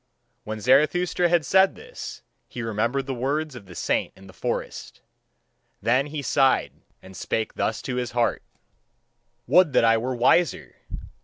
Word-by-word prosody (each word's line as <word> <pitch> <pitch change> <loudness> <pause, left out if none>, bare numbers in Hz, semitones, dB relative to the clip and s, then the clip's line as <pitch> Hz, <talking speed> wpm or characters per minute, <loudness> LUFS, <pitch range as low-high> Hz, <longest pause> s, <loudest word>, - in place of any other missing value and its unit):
When 110 0 -5
Zarathustra 155 - +2
had 170 -3 +2
said 190 +5 +4
this, 485 +2 -9 0.2
he 120 - -7
remembered 115 +5 -1
the 135 - -3
words 140 +4 -2
of 115 -6 -11
the 90 - -12
saint - - -1
in 95 - -16
the 95 - -14
forest. - - -5 0.8
Then 130 +6 +1
he 150 -1 -5
sighed 135 -1 +2 0.3
and 95 0 -13
spake 110 +3 -3
thus 110 - -2
to 125 - -3
his 125 -2 -3
heart: 120 -1 0 1.0
"Would 180 -2 +4
that 115 - +4
I 115 0 +4
were 125 +2 -3
wiser! 140 +8 +2
130 Hz, 155 wpm, -24 LUFS, 115-155 Hz, 1.0 s, said